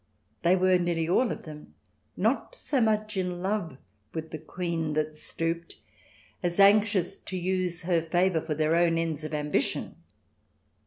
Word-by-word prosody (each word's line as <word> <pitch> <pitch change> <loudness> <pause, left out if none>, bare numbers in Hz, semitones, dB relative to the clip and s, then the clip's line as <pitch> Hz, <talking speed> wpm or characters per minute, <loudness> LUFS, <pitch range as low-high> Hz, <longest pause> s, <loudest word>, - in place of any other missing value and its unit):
They 175 +2 +4
were, 185 0 +4
nearly 170 -2 0
all 230 +8 +2
of - - -6
them, 150 -2 -11 0.4
not - - 0
so 280 - -1
much 215 -1 +1
in 180 -1 -2
love 190 -7 -2 0.4
with 160 0 -5
the 155 - -5
Queen 165 -1 -3
that 155 0 -1
stooped, 165 +2 -3 0.7
as 175 +1 0
anxious 200 -2 +5
to 185 - -6
use 180 -1 -1
her 170 -1 +2
favour 175 +1 +1
for 155 - -3
their 155 +2 +2
own 170 -1 +3
ends 165 -2 -2
of 155 - -5
ambition. 150 -1 -1
175 Hz, 155 wpm, -28 LUFS, 160-185 Hz, 0.7 s, anxious